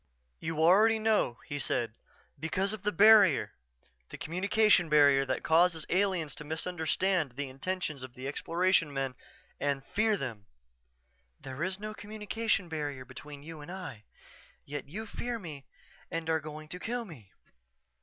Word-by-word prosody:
_" - - -45 0.4
"You 160 -1 -4
already 200 +8 +5
know," 215 - +1
he 145 - -4
said. 115 -3 -1 0.5
"Because 190 +6 -1
of 215 - -6
the 210 +1 0
barrier 205 -4 +6 0.6
the - - -8
communication 185 +1 +3
barrier 140 -2 +5
that 130 - -2
causes 165 -1 +3
aliens 185 -5 +1
to - - -6
misunderstand 160 0 0
the 140 +1 -4
intentions 150 +1 -3
of 130 -1 -10
Exploration 165 +5 +1
men 135 -2 -2 0.5
and 140 -1 -1
fear 215 +5 +1
them." 115 - -6 1.0
"_There 135 +4 -5
is 190 +1 -1
no 215 +1 -5
communication 215 -2 -2
barrier 145 -5 -4
between 140 +3 -10
you 160 0 -9
and 155 +4 -9
I 135 - -7 0.6
yet 140 -1 -6
you 215 +8 -5
fear 240 +2 -4
me 155 -9 -9 0.4
and 165 -1 -2
are 160 - +2
going 155 0 -8
to 180 - -6
kill 235 +3 -3
me. 125 - -13
160 Hz, 150 wpm, -31 LUFS, 140-195 Hz, 1.0 s, barrier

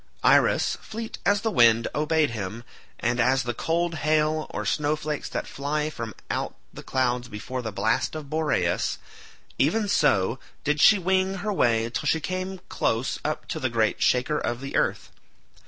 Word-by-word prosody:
Iris, - - +4
fleet 225 0 -7
as 200 0 +3
the 225 - 0
wind, 115 - +5
obeyed 150 -1 +1
him, 110 +1 -5 0.4
and 120 +1 0
as 130 +2 +3
the 120 0 -2
cold 170 +6 -1
hail 155 +1 +1
or - - -4
snow 150 0 +1
flakes 150 -1 -4
that - - -3
fly 150 +2 -2
from 115 -7 -6 0.2
out - - -2 0.2
the - - -9
clouds 125 -2 0
before 115 +4 -5
the 110 -2 -4
blast 110 +9 0
of 155 -2 -6
Boreas, 150 - 0 0.6
even 205 +10 +2
so 115 - +2 0.2
did 150 0 +1
she 210 - +8
wing 190 +1 +1
her 210 - 0
way 115 - +2
till - - -2
she 160 - +3
came 185 +2 -4
close 115 +3 -1
up 155 0 -3
to - - -3
the 130 - 0
great 110 -2 0
shaker 125 +4 +2
of 120 0 -2
the 135 +1 -6
earth. - - 0
145 Hz, 170 wpm, -25 LUFS, 120-160 Hz, 0.6 s, she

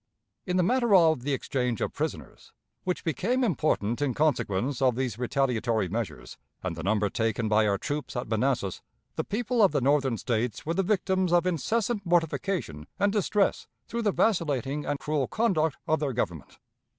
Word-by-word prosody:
In 180 0 0
the 180 - +3
matter 240 +1 +3
of 160 -7 +5
the 145 +3 -2
exchange 125 -3 -1
of - - -2
prisoners, - - -5 0.3
which 180 -1 -2
became 235 - 0
important 145 - 0
in 140 -4 0
consequence 135 -4 0
of 130 -3 +3
these 125 -4 -2
retaliatory 120 -5 0
measures, 95 - -5 0.2
and - - -3
the - - -6
number 105 +1 +1
taken 115 0 -1
by 105 0 +3
our 100 -1 +2
troops 145 +8 -4
at 120 - -3
Manassas, 110 -3 0 0.3
the - - -1
people 240 +3 -1
of 195 -7 +5
the 145 - +2
Northern 135 -2 +2
States 115 -2 -2
were 165 - 0
the 190 - +1
victims 190 -2 +1
of 175 0 +4
incessant 205 +5 0
mortification 170 - -1
and 200 0 +2
distress 210 -1 +1 0.2
through 235 - -3
the 210 -3 +2
vacillating 150 - 0
and 145 - 0
cruel 150 -3 -1
conduct 160 -10 +1
of 155 - +2
their 145 -3 -1
Government. 85 - -4
145 Hz, 175 wpm, -27 LUFS, 115-185 Hz, 0.3 s, of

